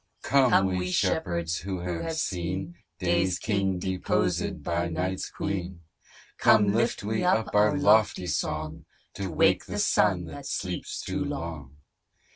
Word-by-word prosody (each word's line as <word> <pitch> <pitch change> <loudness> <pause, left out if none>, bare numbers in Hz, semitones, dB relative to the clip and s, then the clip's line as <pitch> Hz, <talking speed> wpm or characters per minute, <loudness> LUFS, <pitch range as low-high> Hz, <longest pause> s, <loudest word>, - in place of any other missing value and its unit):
COME 115 -9 +3
we 90 0 -2
shepherds 85 -2 0
who 95 0 -4
have 90 - -3
seen 95 - -3 0.2
Day's 90 0 +1
king 100 -3 0
deposed 95 0 -1
by 85 0 -1
Night's 90 +3 -2
queen. 90 -3 -4 0.6
Come 105 -2 +5
lift 115 -1 0
we 110 +1 -1
up 110 -1 +2
our 105 +7 +4
lofty 110 -8 +4
song, 80 0 -3 0.3
To 95 -1 -4
wake 80 - +3
the - - -5
Sun 95 -4 +2
that 70 -4 -8
sleeps - - -4
too - - -2
long. 75 -5 -6
95 Hz, 130 wpm, -27 LUFS, 85-105 Hz, 0.6 s, Come